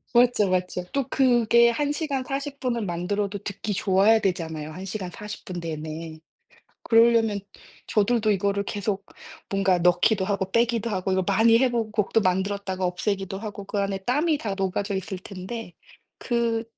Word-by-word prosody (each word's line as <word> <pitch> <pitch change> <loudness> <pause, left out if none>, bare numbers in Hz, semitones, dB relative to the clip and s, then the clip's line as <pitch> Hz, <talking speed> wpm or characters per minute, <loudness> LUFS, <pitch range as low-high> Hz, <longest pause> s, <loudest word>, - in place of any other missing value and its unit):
맞죠, 240 -4 +5
맞죠. 180 0 -1
또 275 -2 -1
그게 235 -2 +4
1 290 +4 -1
시간 290 -4 -2
40 280 +1 -4
분을 235 -4 -1
만들어도 200 +3 -2
듣기 205 +1 -4
좋아야 200 +3 +4
되잖아요. 160 -5 -2
1 185 +4 -8
시간 190 -2 -4
40 210 +1 -8
분 180 -2 -6
내내. 160 0 -6 0.6
그러려면 225 -2 +4 0.5
저들도 215 +1 +2
이거를 200 +1 0
계속 200 0 -3 0.5
뭔가 195 -2 +2
넣기도 180 +3 +3
하고 195 -2 -2
빼기도 235 -1 +1
하고 190 0 -1
이걸 190 0 +1
많이 225 +3 +5
해 255 0 +2
보고 230 -2 -1
곡도 215 +1 +1
만들었다가 190 0 -1
없애기도 195 +1 -2
하고 210 -2 -6
그 205 - -3
안에 195 -1 -1
땀이 295 +4 +2
다 205 -6 -3
녹아져 195 +1 -2
있을 190 0 -3
텐데 190 +1 -7 0.5
그 235 -2 0
200 Hz, 310 characters per minute, -25 LUFS, 185-230 Hz, 0.6 s, 맞죠